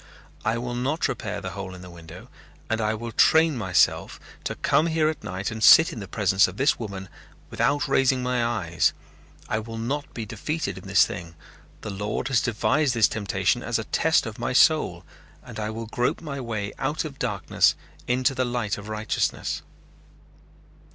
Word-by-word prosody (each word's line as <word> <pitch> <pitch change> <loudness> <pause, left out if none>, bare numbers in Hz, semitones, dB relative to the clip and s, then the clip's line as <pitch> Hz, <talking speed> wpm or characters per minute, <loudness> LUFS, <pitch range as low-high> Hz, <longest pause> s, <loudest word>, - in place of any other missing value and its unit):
"I 115 +1 0
will 120 +1 -4
not 130 +7 0
repair 105 -1 -4
the 90 -1 -5
hole 95 -1 -7
in 90 - -11
the 90 - -10
window 85 -1 -12 0.4
and 115 0 +1
I 110 0 0
will 115 +1 -6
train 160 +6 +4
myself 95 -6 +1 0.3
to - - -2
come 145 +4 +2
here 160 -1 +2
at 155 - -5
night 95 +4 -4
and 110 0 -4
sit 160 +8 +8
in - - -6
the 100 - -7
presence 100 -1 +3
of 95 +2 -9
this 140 +3 +2
woman 100 -4 -6 0.4
without 145 +1 +1
raising 135 -1 +2
my 125 -1 0
eyes. 95 -9 +1 0.5
I 110 - -1
will 115 +1 -7
not 140 +6 -3
be 115 - -4
defeated 155 +9 -4
in - - -12
this 100 +1 +5
thing. 85 -7 -8 0.5
The 105 - -5
Lord 105 +6 -3
has 125 -4 +3
devised 130 +4 +1
this 115 -2 +5
temptation 105 -3 0
as - - -1
a - - -3
test - - +2
of - - -7
my - - -2
soul - - +3 0.4
and 120 -4 -9
I 105 0 -2
will 115 +1 -5
grope 120 +2 -1
my 140 -4 -6
way 110 -4 -4
out 145 +4 -1
of 140 -3 -8
darkness 105 -6 +2 0.3
into 130 +2 +2
the 130 -1 0
light 120 -5 -2
of 105 +1 -10
righteousness." 110 0 -2
115 Hz, 185 wpm, -25 LUFS, 100-130 Hz, 0.5 s, sit